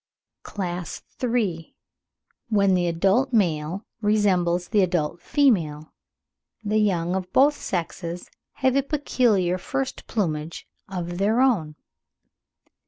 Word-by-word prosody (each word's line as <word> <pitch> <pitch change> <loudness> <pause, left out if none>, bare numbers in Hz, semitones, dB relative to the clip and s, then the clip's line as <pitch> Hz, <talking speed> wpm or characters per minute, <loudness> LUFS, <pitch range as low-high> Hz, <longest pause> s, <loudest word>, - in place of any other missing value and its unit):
CLASS 180 -3 -5 0.2
III. 215 -10 -1 0.4
— - - -48
WHEN 200 -3 +3
THE 180 -1 +2
ADULT 195 +10 +2
MALE 175 -2 0 0.2
RESEMBLES 185 -5 +2
THE 210 -3 +3
ADULT 175 -2 0
FEMALE, 165 - +1 0.7
THE 215 +1 +1
YOUNG 180 -4 +1
OF 185 -1 -4
BOTH 290 +2 +5
SEXES 175 0 -4 0.2
HAVE 260 0 +1
A - - +4
PECULIAR 240 - +1
FIRST 270 +6 -4
PLUMAGE 160 -6 -3 0.2
OF 175 -2 -4
THEIR 215 +5 +2
OWN. 185 -13 +2
190 Hz, 110 wpm, -24 LUFS, 170-225 Hz, 0.7 s, BOTH